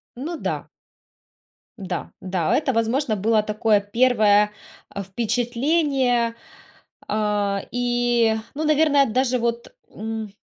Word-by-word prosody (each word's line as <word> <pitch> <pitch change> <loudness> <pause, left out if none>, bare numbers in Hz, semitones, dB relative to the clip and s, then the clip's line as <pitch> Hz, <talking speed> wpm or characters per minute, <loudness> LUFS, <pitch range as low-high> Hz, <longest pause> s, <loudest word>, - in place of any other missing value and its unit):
Ну 310 +7 -5
да. - - -4 1.1
Да, 185 -4 -5
да, 185 -3 0
это, 290 -3 +1
возможно, 230 +1 0
было 215 +2 +2
такое 215 0 +2
первое, 210 -2 +3 0.4
а, 200 - -5
впечатление, 245 - 0 0.7
а, 205 -2 0
и, 240 -2 +1 0.2
ну, 310 - -2
наверное, 300 -2 +4
даже 250 +2 +1
вот, 235 0 -3 0.2
м, 220 -1 -6
230 Hz, 105 wpm, -22 LUFS, 210-255 Hz, 1.1 s, наверное